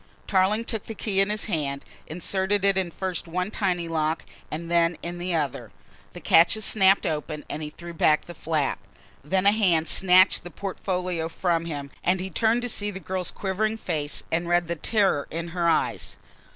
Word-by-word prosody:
Tarling 200 +3 +2
took 220 -3 -4
the 225 - -6
key 200 -2 -1
in 195 - +2
his 210 0 0
hand, 145 -8 -2 0.2
inserted 190 +4 0
it 195 -1 +4
in 190 -2 0
first 180 0 -4
one 180 +4 -2
tiny 180 -6 -1
lock 160 0 -1 0.2
and 165 +2 -5
then 170 -1 +3
in 175 +1 -5
the 175 0 -1
other. 145 -5 -2 0.4
The - - -8
catches 175 +6 +4
snapped 195 -2 +4
open 150 -1 -3
and 155 - -4
he 150 - -4
threw 170 +3 -10
back 155 -2 +3
the 175 - -9
flap. 155 -3 -1 0.4
Then 185 +6 0
a 200 - +7
hand 180 -7 +2
snatched 185 0 +5
the 175 - -8
portfolio 180 -2 -3
from 170 -1 0
him 145 -4 -5
and 185 +1 +2
he 190 +1 -4
turned 230 +7 +2
to - - -1
see 205 -2 -1
the 190 -2 -6
girl's 185 -2 -3
quivering 215 +3 -2
face 155 -8 -3
and 170 +1 0
read 175 -1 +2
the 170 - -2
terror 190 -4 +1
in 170 +1 -4
her 170 0 0
eyes. 160 - -1
175 Hz, 190 wpm, -25 LUFS, 165-195 Hz, 0.4 s, a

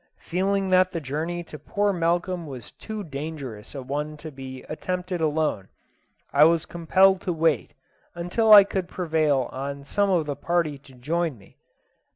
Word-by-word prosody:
Feeling 195 +2 -1
that 185 0 +5
the 175 - -4
journey 160 +5 -3
to 150 -2 -10
poor 205 +7 0
Malcolm 175 0 0
was 125 -6 -8
too 215 -1 -7
dangerous 140 - -7
a 135 - -5
one 150 +3 -4
to 155 +1 -8
be 130 -1 -9
attempted 180 +2 -4
alone, 150 -11 0 0.6
I 140 +1 +6
was 165 0 +3
compelled 185 +2 +3
to 180 - -2
wait 160 -5 0 0.4
until 180 +6 +1
I 205 -1 +12
could 190 -2 -3
prevail 155 -7 +1
on 140 +1 -5
some 200 +7 +1
of 175 -5 +2
the 145 -1 -3
party 170 -4 -1
to 135 -1 -18
join 155 +3 -1
me. 100 - -21
160 Hz, 165 wpm, -25 LUFS, 140-180 Hz, 0.6 s, I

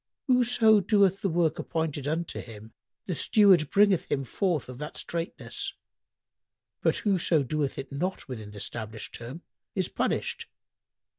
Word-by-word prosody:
Whoso 245 -4 +5
doeth 200 -2 +3
the 195 - +1
work 165 -1 +1
appointed 155 -4 -2
unto 165 +2 -2
him, 110 -1 -11 0.3
the 185 - -2
steward 185 -3 +5
bringeth 200 -3 +4
him 135 - +1
forth 170 - -1
of 125 0 -9
that 150 0 -6
straitness; 170 0 -4 1.1
but - - +2
whoso 175 -6 +3
doeth 145 +1 -2
it 135 0 -6
not 180 +7 -3
within 110 -6 -7
the 105 0 -10
stablished 110 0 -6
term 125 +9 -8 0.3
is 185 -2 0
punished. - - -1
160 Hz, 140 wpm, -28 LUFS, 135-190 Hz, 1.1 s, Whoso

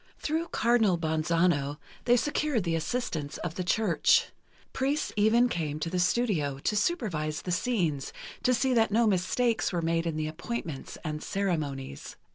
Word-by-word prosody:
Through 320 +2 -1
Cardinal 225 - +3
Bonzano 160 -2 +1 0.3
they 245 0 +5
secured 295 -3 0
the 170 -1 -1
assistance 160 - -2
of 175 - -4
the 185 - -3
Church. 225 - +3 0.4
Priests 280 +3 -1
even 220 +4 +4
came 155 -8 -3
to 165 +1 -3
the 180 - 0
studio, 175 - +1
to 175 +9 -1
supervise 190 - -1
the 180 - -3
scenes, 175 - 0 0.3
to 255 - +2
see 260 +2 +1
that 225 -2 +3
no 230 +3 +3
mistakes 220 +4 +1
were 175 - -1
made 165 +1 0
in 165 - -2
the 155 0 -1
appointments 160 - -5
and 150 0 -4
ceremonies. 150 - -3
180 Hz, 155 wpm, -28 LUFS, 155-235 Hz, 0.4 s, they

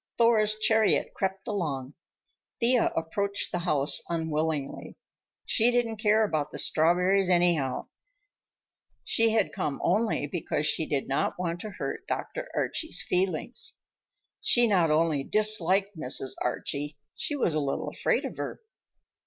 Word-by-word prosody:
Thor's 215 -2 +4
chariot 220 0 +2
crept 190 +1 -3
along. 150 - -3 0.7
Thea 245 0 +3
approached 200 +5 -2
the 175 - -1
house 150 -5 +2
unwillingly. 160 -3 -2 0.5
She 235 +1 +3
didn't 240 -2 0
care 215 +1 +3
about 155 -8 -1
the - - -8
strawberries, 180 +4 +2
anyhow. 175 -7 +1 1.1
She 225 0 +2
had 220 0 +1
come 150 -8 -3
only 215 -8 +1
because 150 -1 -2
she 155 +1 +1
did 140 -2 -1
not 135 - -1
want 175 -1 -3
to 215 - -6
hurt - - -5
Dr. - - -4
Archie's 320 - -1
feelings. 185 +4 -1 0.6
She 240 0 +5
not 185 -7 +3
only 155 -2 +2
disliked 200 0 +3
Mrs. 135 -3 -3
Archie, 145 +4 -3 0.2
she 295 - -3
was 215 - 0
a 155 - +1
little 140 -2 -2
afraid - - 0
of - - -6
her. - - -5
180 Hz, 135 wpm, -27 LUFS, 155-215 Hz, 1.1 s, She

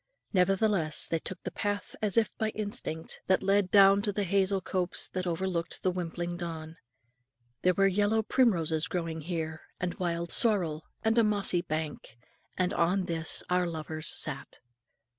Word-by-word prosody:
Nevertheless 190 -3 +2
they 165 - -1
took 185 +2 -8
the - - -4
path 205 -1 -3
as 210 0 0
if 225 -2 +2
by 220 - +1
instinct, 205 -7 -5
that 190 0 +2
led 195 -1 +2
down 195 0 +6
into 205 0 -1
the 205 +1 -1
hazel 195 +1 +1
copse 185 -1 -3
that 185 0 -3
overlooked 175 0 -3
the 185 - +2
wimpling 175 -1 -4
Don. 165 -2 -6 0.8
There 180 0 +2
were 195 - +3
yellow 205 +3 +2
primroses 170 -10 +1
growing 165 -3 -3
here, 160 -1 -4 0.2
and 180 -1 -2
wild 170 -1 -2
sorrel, 175 -9 +2 0.2
and 225 +1 +3
a - - +5
mossy 200 -4 +2
bank; 155 -7 -5 0.4
and 185 +1 0
on 180 +3 +1
this 165 -2 +4
our 180 0 +1
lovers 155 -1 -3
sat. 140 -3 +1
180 Hz, 160 wpm, -29 LUFS, 165-200 Hz, 0.8 s, down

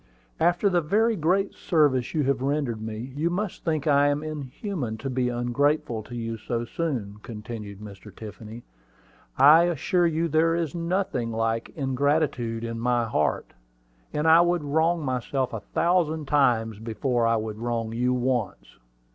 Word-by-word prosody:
"After 175 +4 +3
the 180 -3 +2
very 220 +8 +2
great 185 +4 +1
service 145 -7 +1
you 150 - +2
have 135 -1 0
rendered 135 -5 -1
me, 110 +4 -6
you 160 +4 0
must 190 +2 -3
think 155 -4 -1
I 145 -1 +4
am 145 +1 0
inhuman 150 - -5
to 130 +4 -4
be 125 -1 0
ungrateful 120 0 0
to 120 +3 -10
you 115 -1 -4
so 120 +1 -3
soon," 120 -9 -3
continued 105 -3 -8
Mr. 105 0 -11
Tiffany. 110 +1 -9 0.7
"I 160 +4 +7
assure 175 +1 +1
you 165 +1 0
there 165 +1 +2
is 165 -4 -2
nothing 170 -8 -1
like 115 0 -1
ingratitude 135 -4 0
in 115 0 -4
my 120 0 +1
heart; 75 -9 -1 0.6
and 150 +2 -1
I 165 +1 +8
would 175 -2 +1
wrong 160 +2 +1
myself 130 0 -2
a 115 - -3
thousand 160 - 0
times 115 -7 +2
before 115 +2 0
I 115 - +3
would 110 -1 -4
wrong 115 -1 -2
you 125 +2 +1
once." 125 - -2
130 Hz, 155 wpm, -25 LUFS, 115-160 Hz, 0.7 s, I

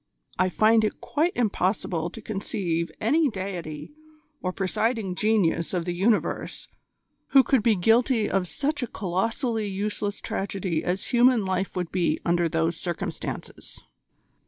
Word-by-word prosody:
I 185 0 +3
find 220 +3 +4
it 215 - -1
quite 325 +4 0
impossible 185 -6 0
to 215 +4 -10
conceive 185 -5 -2
any 295 +7 +3
deity 180 - -6 0.5
or 185 - -1
presiding 200 +2 -1
genius 185 -4 +1
of 170 -2 -1
the 175 - -2
universe 205 +5 0 0.7
who 270 -1 +8
could 255 0 +3
be 220 0 +3
guilty 225 +4 +3
of 190 -2 0
such 290 - -1
a 245 - -1
colossally 220 +4 -1
useless 205 +1 -3
tragedy 190 -4 -2
as 180 +2 -2
human 245 -3 +4
life 190 0 -1
would 180 -2 -3
be 175 -4 +1
under 170 -1 +2
those 165 +1 0
circumstances." 175 -1 -5
195 Hz, 135 wpm, -26 LUFS, 180-225 Hz, 0.7 s, who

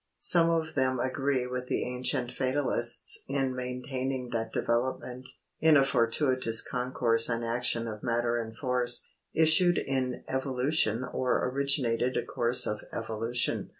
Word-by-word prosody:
Some 170 -1 +3
of 160 -1 -1
them 130 -2 0
agree 130 0 0
with 125 0 -5
the - - -1
ancient 125 0 -1
Fatalists 130 -3 +1
in 135 -1 -1
maintaining 125 0 -4
that 115 -1 -2
development, 125 +1 -2 0.3
in 160 -2 +5
a 135 - +5
fortuitous 130 -2 +2
concourse 125 -3 +1
and 115 -1 -1
action 115 0 0
of 105 -1 -6
matter 120 0 0
and 110 0 -9
force, 125 -2 0 0.3
issued 160 +2 +4
in 130 -2 -2
evolution 130 -2 0
or 130 0 -1
originated 130 -3 +1
a - - -1
course 120 +1 +3
of 105 0 -3
evolution. 115 +2 -1
125 Hz, 135 wpm, -29 LUFS, 120-135 Hz, 0.3 s, in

